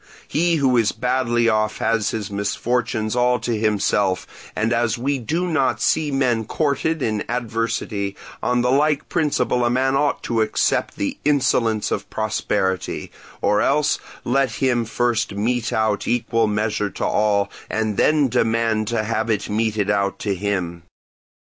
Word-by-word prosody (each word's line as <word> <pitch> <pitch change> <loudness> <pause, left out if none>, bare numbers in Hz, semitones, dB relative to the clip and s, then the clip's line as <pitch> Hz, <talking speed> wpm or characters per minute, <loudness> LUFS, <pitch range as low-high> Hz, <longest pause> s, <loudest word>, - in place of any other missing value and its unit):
He 170 +2 +1
who 135 -5 +2
is 115 -3 +3
badly 125 -2 +1
off 110 -1 +1
has 110 -2 +1
his 105 -3 -4
misfortunes 110 +2 -1
all 125 0 +3
to 120 - -1
himself, 105 -3 +1 0.3
and 110 +3 +1
as 115 -1 +1
we 135 +3 -1
do 160 +9 -1
not 155 -6 +1
see 155 -2 +1
men 125 -5 +1
courted 155 +3 -1
in 110 -2 -1
adversity, 115 -4 -2 0.3
on 125 0 +1
the 125 - +2
like 145 +2 +2
principle 145 -5 +1
a 120 - +2
man 130 +2 +1
ought 145 +1 +1
to 115 -2 0
accept 110 - 0
the 100 - -3
insolence 125 -6 +1
of - - -3
prosperity; 95 -2 -2 0.3
or 105 +1 +3
else, 150 +2 +2 0.2
let 130 -1 +1
him 120 -3 +1
first 120 -1 0
mete 115 +3 0
out 110 -2 0
equal 115 -1 +1
measure 105 0 -1
to - - -4
all, 100 -1 +1 0.2
and 110 -1 -1
then 150 +5 +3
demand 115 -2 +1
to 115 -1 0
have 110 +1 -1
it 105 -2 -1
meted 105 -2 0
out 100 -2 0
to 100 -1 -2
him. 90 -3 -2
115 Hz, 155 wpm, -21 LUFS, 105-125 Hz, 0.3 s, is